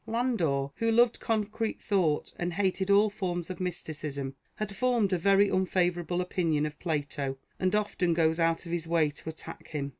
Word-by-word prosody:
Landor, 190 - 0
who 230 0 +1
loved 235 +1 +4
concrete 220 0 -1
thought 175 -7 0
and 175 0 -1
hated 190 0 0
all 205 +1 +5
forms 175 -3 -3
of 185 - -7
mysticism, 150 -6 -4 0.2
had 210 -2 -4
formed 235 -4 +2
a - - +3
very 195 +3 +5
unfavourable 180 -2 +1
opinion 165 -4 0
of 150 0 -6
Plato, 145 -4 -2 0.2
and 185 +2 +1
often 190 -5 +1
goes 160 0 +2
out 165 0 +1
of 170 - -7
his 170 -1 -2
way 160 -3 +2
to 145 +2 -8
attack 160 +1 -9
him. 140 -3 -3
175 Hz, 175 wpm, -29 LUFS, 160-200 Hz, 0.2 s, all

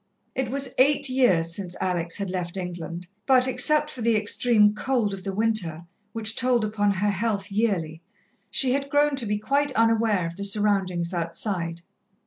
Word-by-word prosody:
It 260 -3 -2
was 270 0 -2
eight 280 +1 +3
years 185 -11 +2
since 185 -3 -5
Alex 175 -2 -1
had 200 -2 -3
left 180 0 -4
England, 175 -1 -6 0.2
but, 260 -1 +5
except 300 +4 +3
for 250 - -9
the 230 0 +2
extreme 210 0 +3
cold 220 -2 -1
of 190 -1 -7
the 195 - -3
winter, 190 -6 -1 0.3
which 225 0 -3
told 245 -3 +2
upon 210 -1 0
her 205 +2 0
health 200 0 -2
yearly, 185 -7 -1 0.5
she 260 -3 +1
had 275 +1 -1
grown 290 0 +2
to 240 -5 0
be 210 0 0
quite 280 +6 0
unaware 225 -5 +2
of 170 +1 -6
the 200 - -5
surroundings 195 -4 0
outside. 170 0 -3
210 Hz, 170 wpm, -25 LUFS, 180-250 Hz, 0.5 s, but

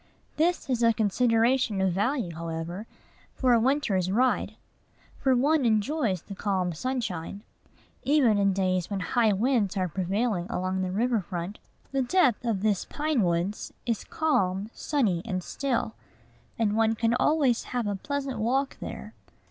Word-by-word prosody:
This 340 +2 +1
is 250 -3 0
a 230 -1 +5
consideration 230 +1 +2
of 190 -2 +2
value, 205 - -1
however, 165 +5 -5 0.5
for 255 -2 +3
a 235 - +5
winter's 225 -8 +1
ride; 250 +5 +1 0.6
for 265 -2 +3
one 290 +4 +3
enjoys 220 - +1
the 200 - -8
calm 190 -3 -1
sunshine. 205 -3 -4 0.6
Even 260 -8 +3
in 200 0 +3
days 185 -2 0
when 200 -2 -2
high 220 +4 +2
winds 215 -1 +1
are 185 -1 +1
prevailing 190 +2 -1
along 185 +1 -1
the 185 - -1
river 230 +3 +1
front, 180 +2 -5 0.3
the 275 -1 +1
depth 260 - +2
of 220 -5 0
these 210 -3 +1
pine 300 -4 -1
woods 175 +3 -1
is 230 -3 -1
calm, 205 -10 0
sunny, 220 - 0
and 185 -5 -3
still; 250 -3 -2 0.6
and 215 -2 +1
one 225 0 +2
can 225 +1 +1
always 260 -2 +2
have 245 -2 -2
a 205 -1 -1
pleasant 275 +2 -3
walk 265 +5 0
there. - - -7
220 Hz, 150 wpm, -27 LUFS, 190-255 Hz, 0.6 s, a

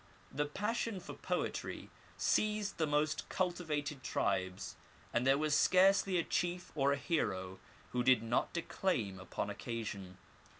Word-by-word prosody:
The 145 +1 -1
passion 210 +5 -1
for 180 - -8
poetry - - -3 0.3
seized 210 -3 +1
the 160 - +2
most 150 +1 0
cultivated 155 -6 -1
tribes, 95 -5 -1 0.4
and 120 +2 +2
there 135 +1 +6
was 155 0 +1
scarcely 190 +3 +5
a 170 - +2
chief 175 +1 -1
or 140 -2 +3
a - - +3
hero 95 - -1 0.3
who 125 - +1
did 130 -2 +5
not 115 +2 +1
declaim 120 - -1
upon 95 - -3
occasion. 100 -5 -5
150 Hz, 135 wpm, -35 LUFS, 115-180 Hz, 0.4 s, there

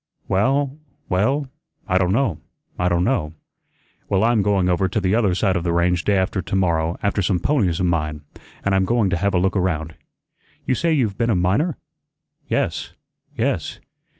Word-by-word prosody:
"Well, 135 +8 +1 0.3
well, 120 +11 +1 0.4
I 95 -2 +2
don' 90 -1 +1
know, 110 - +1 0.4
I 90 - +2
don' 85 0 +1
know." 90 - 0 0.8
"Well, 95 +1 +2
I'm 115 -1 +3
going 100 -2 +2
over 90 +1 +2
to 105 +4 -1
the 95 -1 0
other 105 -6 +2
side 95 0 +1
of 85 - -1
the 85 - 0
range 85 0 +1
day 100 -1 +3
after 95 +1 0
t'morrow 85 -2 0
after 100 0 +1
some 95 0 +1
ponies 100 - +1
of 90 - +1
mine, 75 -3 -1 0.4
an' 100 - +2
I'm 95 0 +3
going 115 -3 +1
to 95 - +1
have 100 +2 0
a - - +4
look 95 +2 +1
around. 80 -4 -1 0.7
You - - +1
say 165 +6 0
you've 120 -10 0
been 115 0 +1
a 110 - +3
miner?" 100 - +1 0.7
"Yes, - - -2 0.4
yes." - - -1
95 Hz, 180 wpm, -21 LUFS, 90-110 Hz, 0.8 s, a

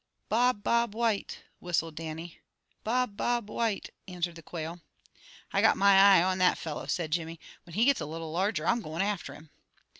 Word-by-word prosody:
"Bob, 235 -1 +2
Bob 235 -2 +1
White," 225 -3 -1 0.2
whistled 165 -2 -1
Dannie. 160 +1 -7 0.4
"Bob, 245 -1 0
Bob 240 -1 -1
White," 225 -4 -2 0.2
answered 175 -2 -3
the 165 - -11
quail. 165 +1 -6 0.7
"I - - +3
got - - +4
my 200 0 +5
eye 195 -2 +7
on 185 0 0
that 180 0 +4
fellow," 155 -3 -6
said 165 -3 -2
Jimmy. 165 0 -2 0.3
"When 170 - -11
he 225 +3 +3
gets 280 -2 +3
a - - -4
little 160 0 -6
larger, 180 -1 -1
I'm 235 +4 +2
going 165 0 -3
after 200 -2 -3
him." 155 -1 -15
185 Hz, 180 wpm, -29 LUFS, 165-215 Hz, 0.7 s, eye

